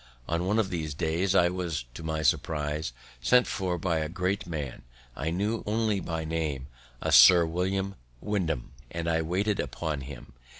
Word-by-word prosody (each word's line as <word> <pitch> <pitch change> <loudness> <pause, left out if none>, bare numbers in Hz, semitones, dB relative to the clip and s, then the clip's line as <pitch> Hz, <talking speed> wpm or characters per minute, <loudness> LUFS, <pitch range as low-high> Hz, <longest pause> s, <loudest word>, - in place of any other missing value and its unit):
On 85 +2 -1
one 105 +3 +2
of 110 -4 +1
these 80 -4 -3
days, 85 +5 0
I 85 -2 +5
was, 85 -7 -3
to 65 - -8
my 80 -1 -2
surprise, 75 -1 0 0.3
sent 125 - +5
for 90 -3 -2
by 85 -1 0
a 75 0 -2
great 90 +3 -1
man 75 -6 -4 0.3
I 80 - -2
knew 105 +6 -1
only 110 -1 +1
by 80 -3 -3
name, 80 -5 -2 0.4
a - - 0
Sir 90 -2 +9
William 95 +4 -1 0.3
Wyndham, 85 - -2 0.2
and 85 0 -4
I 80 -1 +2
waited 95 +6 0
upon 75 +2 -2
him. 65 -2 -10
85 Hz, 170 wpm, -28 LUFS, 80-95 Hz, 0.4 s, Sir